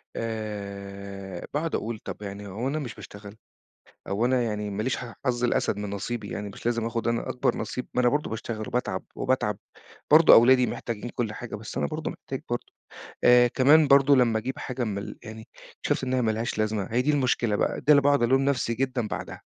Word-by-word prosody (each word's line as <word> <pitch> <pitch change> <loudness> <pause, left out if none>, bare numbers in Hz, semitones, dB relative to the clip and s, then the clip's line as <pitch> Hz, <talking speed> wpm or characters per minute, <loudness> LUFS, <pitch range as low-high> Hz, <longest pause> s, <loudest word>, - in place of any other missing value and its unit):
آآ 100 -4 -6
باقعد 160 +2 -1
أقول 110 -1 -3
طَب - - -8
يعني 100 0 -7
هو 105 +6 -3
أنا 150 +3 -1
مش 125 -7 -6
باشتغل، 105 0 -11 0.7
أو 100 +4 0
أنا 125 0 +2
يعني 105 -2 -2
ما 100 +1 -3
ليش 130 - 0
حظ 120 +1 -3
الأسد 120 -3 +1
من 105 -1 -4
نصيبي 105 +1 -4
يعني 105 0 -4
مش 100 - -10
لازم 115 -1 0
آخد 115 0 -2
أنا 115 0 -1
أكبر 125 - 0
نصيب، 115 +3 -4
ما - - +2
أنا 125 - +4
برضه 145 +4 0
باشتغل 110 -1 -5
وباتعب 95 -6 -2
وباتعب، 130 -6 0 0.5
برضه 155 +2 +8
أولادي 125 +2 +6
محتاجين 115 0 -5
كلّ 115 -3 -2
حاجة 120 0 -6
بس 105 +1 -9
أنا 70 - +1
برضه - - -4
محتاج - - -7
برضه، - - -2 0.6
آآ 125 0 +7
كمان 145 +5 +5
برضه 140 0 +6
لمّا 120 -4 +3
أجيب 130 +4 -5
حاجة 125 -1 -3
من 105 -4 -2
ال 100 - -6
يعني، 110 0 -9 0.3
شُفت - - 0
إن 130 0 -1
هي 130 - +2
ما 110 -2 +2
لهاش 110 +1 -3
لازمة، 110 -2 -1
هي 120 +2 +2
دي 145 +4 +2
المشكلة 125 -6 +1
بقى، - - -1
ده - - -24
اللي 140 - +6
باقعد 140 -2 +3
الوم 130 +3 +3
نفْسي 135 -4 +1
جدًا 125 -1 -1
بعدها، - - -6
115 Hz, 205 wpm, -26 LUFS, 105-130 Hz, 0.7 s, برضه